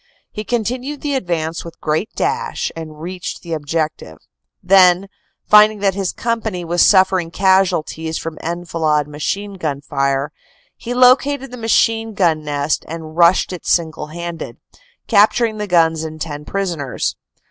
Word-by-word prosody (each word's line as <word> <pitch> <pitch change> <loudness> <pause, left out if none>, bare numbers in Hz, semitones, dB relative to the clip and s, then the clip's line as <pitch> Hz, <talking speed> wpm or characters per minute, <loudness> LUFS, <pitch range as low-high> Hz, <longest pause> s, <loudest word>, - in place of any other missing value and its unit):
He 210 - -5
continued 245 +6 -3
the 290 -1 -2
advance 170 -9 -2
with 170 - -11
great 155 +7 -1
dash 460 +3 -2
and 155 -2 -8
reached 180 +2 -6
the 170 -2 -5
objec 155 +1 -2
tive. 80 -1 -12 0.5
Then, 185 0 +5 0.4
finding 210 0 +6
that 195 -1 +2
his 195 -1 -2
company 220 -6 -3
was 170 +1 +3
suffering 185 -3 +4
casualties 175 -4 +1
from 160 -1 -6
enfilade 165 -3 -1
machine 195 +7 -4
gun 145 -4 -2
fire, 140 0 -1 0.4
he 245 +1 -5
located 260 +2 +4
the 250 - -8
machine 225 -1 +1
gun 165 -5 +2
nest 145 0 -1
and 160 -1 -8
rushed 175 +2 +4
it 180 - -8
single 160 -2 0
handed, 170 +1 -7 0.5
capturing 220 +1 +3
the 210 - -3
guns 165 -3 +3
and 155 0 -7
10 150 -2 -5
prisoners. 175 -9 -2
175 Hz, 145 wpm, -18 LUFS, 160-210 Hz, 0.5 s, finding